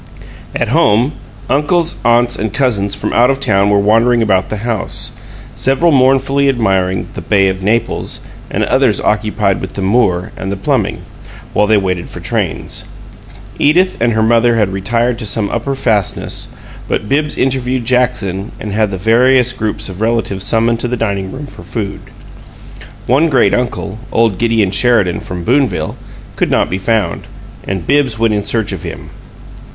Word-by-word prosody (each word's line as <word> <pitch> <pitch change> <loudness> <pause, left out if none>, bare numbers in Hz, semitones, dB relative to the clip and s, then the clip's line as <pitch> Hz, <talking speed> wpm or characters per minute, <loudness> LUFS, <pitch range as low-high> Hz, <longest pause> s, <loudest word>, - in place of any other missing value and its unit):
At - - 0
home, 115 +7 +3 0.4
uncles, 165 +4 +1
aunts, 120 0 +3
and 110 -1 -3
cousins 105 -5 0
from - - -3
out 120 +1 +4
of 135 0 0
town 100 -6 +2
were 105 - +3
wandering 115 +4 +3
about 95 -3 +1
the 110 +1 -4
house, 115 -5 -1 0.4
several 135 +6 +2
mournfully 135 +1 +3
admiring 95 -7 0
the - - -6
"Bay 100 -2 +2
of 95 0 -4
Naples," 110 +4 -1 0.3
and - - -1
others 130 -6 +2
occupied 105 -2 0
with 95 - -6
the 100 - -4
Moor 95 -4 +1
and 95 - -5
the 100 - -3
plumbing, 95 - -1 0.5
while 105 - +2
they 110 0 +4
waited 90 -3 -2
for - - -8
trains. - - -3 0.7
Edith 180 +6 +3
and 120 0 +2
her 110 0 +1
mother 120 +1 +3
had 105 -4 +1
retired 115 +5 0
to 110 - -4
some 100 +1 -1
upper 125 +4 -2
fastness, 110 -7 -1 0.4
but 105 - -2
Bibbs 150 +5 0
interviewed 130 -2 0
Jackson 115 -5 0
and 105 - -5
had 110 0 +1
the 95 - -4
various 125 +5 +3
groups 110 -2 -2
of 95 +1 -8
relatives 110 -4 0
summoned 115 +2 +1
to 120 - -1
the 125 +1 -2
dining 100 -4 -2
room 140 +2 -7
for 140 - -11
food. 105 -4 -5 1.1
One 145 +7 +3
great 125 -8 +3
uncle, 120 -4 -2
old 115 -5 +1
Gideon 115 -4 +2
Sheridan 100 -5 +2
from 90 -1 -6
Boonville, 125 -2 0 0.4
could - - +1
not - - +1
be 95 - -1
found, 105 -4 -1 0.4
and 95 -3 -4
Bibbs 140 -6 +1
went 115 -1 +2
in 105 -1 -1
search 110 0 -1
of 95 -4 -5
him. - - -8
115 Hz, 165 wpm, -14 LUFS, 100-125 Hz, 1.1 s, out